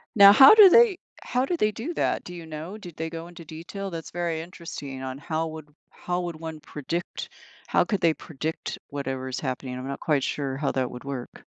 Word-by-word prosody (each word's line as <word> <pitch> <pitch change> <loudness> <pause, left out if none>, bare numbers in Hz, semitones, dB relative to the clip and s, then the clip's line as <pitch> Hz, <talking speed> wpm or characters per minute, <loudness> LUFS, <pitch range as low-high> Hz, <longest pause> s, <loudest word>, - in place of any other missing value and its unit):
Now, 200 -1 +10
how 270 - +10
do 420 -3 +10
they 455 -1 +6 0.3
how 250 +1 0
do 350 - -1
they 215 -10 +2
do 250 +11 -5
that? - - 0
Do 180 - -9
you 170 - -8
know? 160 +6 -7
Did 180 -6 -11
they 160 0 -3
go 165 +1 -7
into 175 -1 -12
detail? 170 +6 -7
That's 165 -2 -7
very 170 -2 -2
interesting, 160 -6 -8
on 130 0 -5
how 160 +1 -2
would 155 -2 -9 0.2
how 180 0 -3
would 170 -2 -4
one 160 -1 -6
predict 155 +4 -5 0.4
how - - +3
could 205 - -1
they 165 -1 +4
predict 160 +1 -5
whatever 135 -2 -4
is 130 - -3
happening? 130 -2 -4
I'm 130 +1 -6
not 140 0 -5
quite 145 -4 +1
sure 135 -2 -2
how 140 0 0
that 130 -2 -1
would 125 +2 -9
work. 135 -3 -7
160 Hz, 220 wpm, -26 LUFS, 140-180 Hz, 0.4 s, Now